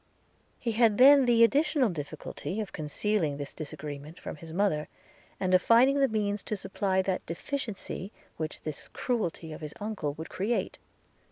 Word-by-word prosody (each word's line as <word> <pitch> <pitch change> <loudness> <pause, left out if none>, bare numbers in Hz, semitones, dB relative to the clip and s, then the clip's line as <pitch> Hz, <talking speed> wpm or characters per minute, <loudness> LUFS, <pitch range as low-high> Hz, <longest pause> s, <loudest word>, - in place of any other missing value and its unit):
He 235 - -2
had 220 -2 +4
then 275 +1 +8
the 235 -1 +5
additional 280 +1 +3
difficulty 170 +5 -5
of 210 -3 -4
concealing 155 0 -1
this 145 -1 -6
disagreement 150 +1 -7
from - - -7
his 160 +1 -10
mother, 170 -4 +1 0.5
and 185 -1 0
of 185 - +6
finding 255 +7 +5
the 275 - +5
means 210 -2 -1
to 215 - -2
supply 190 0 0
that 185 -1 -1
deficiency 205 -1 -4 0.2
which 155 -1 -5
this 155 -2 -6
cruelty 175 -9 -2
of 155 - -9
his 150 -1 -7
uncle 205 -9 -3
would 160 +1 -7
create. 210 +6 -1
195 Hz, 160 wpm, -29 LUFS, 160-230 Hz, 0.5 s, then